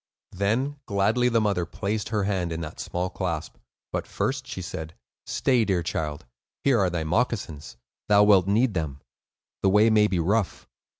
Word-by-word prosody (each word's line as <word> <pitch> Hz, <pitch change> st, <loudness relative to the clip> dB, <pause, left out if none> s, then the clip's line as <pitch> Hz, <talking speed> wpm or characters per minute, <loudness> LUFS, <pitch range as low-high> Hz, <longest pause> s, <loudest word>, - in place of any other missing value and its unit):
Then 115 Hz, +10 st, 0 dB
gladly 110 Hz, +4 st, +2 dB
the 115 Hz, -1 st, +3 dB
mother 100 Hz, -5 st, +1 dB
placed 105 Hz, +5 st, -3 dB
her 105 Hz, -2 st, 0 dB
hand 95 Hz, -4 st, -1 dB
in 80 Hz, 0 st, -3 dB
that 75 Hz, -2 st, -7 dB
small 90 Hz, +1 st, -2 dB
clasp; 85 Hz, -5 st, -4 dB, 0.4 s
but -, -, -2 dB
first 130 Hz, -1 st, -2 dB
she 95 Hz, -, -6 dB
said: 80 Hz, -2 st, -6 dB, 0.3 s
"Stay, 125 Hz, -3 st, +2 dB
dear 95 Hz, -5 st, 0 dB
child; 75 Hz, -5 st, -3 dB, 0.4 s
here 135 Hz, -4 st, +4 dB
are 95 Hz, -2 st, +3 dB
thy 85 Hz, -2 st, -2 dB
moccasins. 80 Hz, -, -2 dB, 0.3 s
Thou 105 Hz, 0 st, +6 dB
wilt 100 Hz, -3 st, +5 dB
need 110 Hz, +3 st, +2 dB
them; 75 Hz, -5 st, -3 dB, 0.6 s
the 95 Hz, -, +3 dB
way 105 Hz, +3 st, +5 dB
may 105 Hz, -1 st, +5 dB
be 95 Hz, -, -1 dB
rough." 100 Hz, +4 st, 0 dB
100 Hz, 170 wpm, -26 LUFS, 85-110 Hz, 0.6 s, Thou